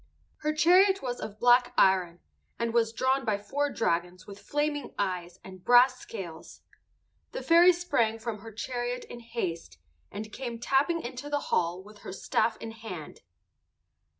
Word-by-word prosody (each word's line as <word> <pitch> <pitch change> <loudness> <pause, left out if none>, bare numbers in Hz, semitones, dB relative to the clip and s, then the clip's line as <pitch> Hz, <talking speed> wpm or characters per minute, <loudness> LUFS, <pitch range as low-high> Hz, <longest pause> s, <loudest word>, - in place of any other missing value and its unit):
Her 305 - -1
chariot 365 +5 +4
was 245 -1 -3
of 210 0 -7
black 245 0 +4
iron, 180 -3 +3 0.4
and 235 -1 -2
was 230 -1 +2
drawn 260 +3 +1
by 215 -3 0
four 285 +8 -2
dragons 180 -5 -2
with 200 0 -11
flaming 295 0 -2
eyes 180 -3 -3
and 185 -1 -12
brass 250 +1 +5
scales. 185 -10 -9 0.7
The - - -5
fairy 340 +2 +7
sprang 335 -11 0
from 225 -1 -5
her 225 +2 -10
chariot 245 +2 -4
in 240 - -10
haste, 185 - -5 0.3
and 215 0 -7
came 240 -3 -5
tapping 290 +7 +1
into 255 +4 -6
the 290 0 0
hall 175 +2 0
with 210 +1 -15
her - - -8
staff 220 +4 0
in 225 - -7
her 225 - -15
hand. 180 -9 -8
230 Hz, 160 wpm, -28 LUFS, 195-270 Hz, 0.7 s, fairy